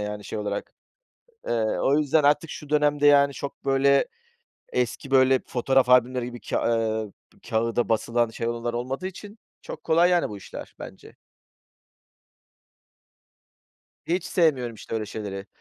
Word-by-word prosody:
yani 105 Hz, 0 st, -5 dB
şey -, -, -5 dB
olarak. 105 Hz, -1 st, -4 dB, 0.8 s
Eee, -, -, 0 dB, 0.3 s
o 140 Hz, +2 st, +3 dB
yüzden 150 Hz, +1 st, +2 dB
artık 150 Hz, +2 st, +3 dB
şu 150 Hz, -, -9 dB
dönemde 145 Hz, -1 st, +3 dB
yani 140 Hz, -1 st, +5 dB
çok, 140 Hz, +1 st, -7 dB
böyle, 140 Hz, 0 st, +3 dB, 0.7 s
eski, 125 Hz, +2 st, -2 dB
böyle, 130 Hz, -1 st, +4 dB
fotoğraf 130 Hz, +1 st, +2 dB
albümleri 125 Hz, 0 st, +3 dB
gibi 120 Hz, -1 st, -8 dB
ka -, -, -2 dB
ııı, 110 Hz, -2 st, -1 dB, 0.4 s
kâğıda 115 Hz, +1 st, 0 dB
basılan 115 Hz, +1 st, +1 dB
şey 115 Hz, +1 st, -3 dB
olanlar 120 Hz, 0 st, -3 dB
olmadığı 130 Hz, +8 st, -3 dB
için 205 Hz, +3 st, -9 dB, 0.2 s
çok -, -, -9 dB
kolay 170 Hz, +3 st, +4 dB
yani 175 Hz, -1 st, +2 dB
bu 105 Hz, -, -7 dB
işler 100 Hz, -, -10 dB
bence. -, -, -11 dB, 2.9 s
Hiç 175 Hz, +1 st, -1 dB
sevmiyorum, 150 Hz, -10 st, +1 dB
işte, 110 Hz, -, -8 dB
öyle 110 Hz, -1 st, -2 dB
şeyleri. 100 Hz, -2 st, -6 dB
130 Hz, 140 wpm, -25 LUFS, 115-145 Hz, 2.9 s, yani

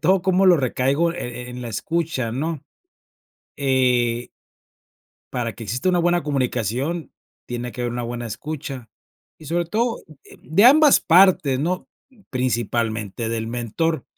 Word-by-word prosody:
todo 185 Hz, +3 st, +3 dB
como 190 Hz, 0 st, +3 dB
lo 180 Hz, -2 st, +7 dB
recaigo, 140 Hz, +5 st, +1 dB
e 125 Hz, -6 st, -6 dB
en 125 Hz, 0 st, -7 dB
la 120 Hz, -, -5 dB
escucha, 150 Hz, -1 st, -2 dB
¿no?, 150 Hz, +3 st, -3 dB, 0.9 s
eh 125 Hz, -3 st, +1 dB, 1.0 s
para 120 Hz, -2 st, -2 dB
que 115 Hz, -, -8 dB
exista 125 Hz, -, -1 dB
una 180 Hz, -1 st, +3 dB
buena 175 Hz, 0 st, +2 dB
comunicación, 135 Hz, -, -2 dB, 0.4 s
tiene 120 Hz, 0 st, -4 dB
que 125 Hz, -, -7 dB
haber 120 Hz, -1 st, -2 dB
una 120 Hz, 0 st, -3 dB
buena 120 Hz, 0 st, -4 dB
escucha, 135 Hz, -1 st, -6 dB, 0.5 s
y 155 Hz, -, -13 dB
sobre 170 Hz, +2 st, 0 dB
todo, 230 Hz, +6 st, -1 dB, 0.2 s
eh, -, -, -16 dB
de 190 Hz, +9 st, +3 dB
ambas 295 Hz, +2 st, +7 dB
partes, 165 Hz, -7 st, +4 dB
¿no?, 180 Hz, +5 st, -2 dB, 0.4 s
principalmente 115 Hz, -3 st, -1 dB
del 115 Hz, -1 st, -2 dB
mentor. 125 Hz, +6 st, -2 dB
130 Hz, 140 wpm, -22 LUFS, 120-170 Hz, 1.0 s, lo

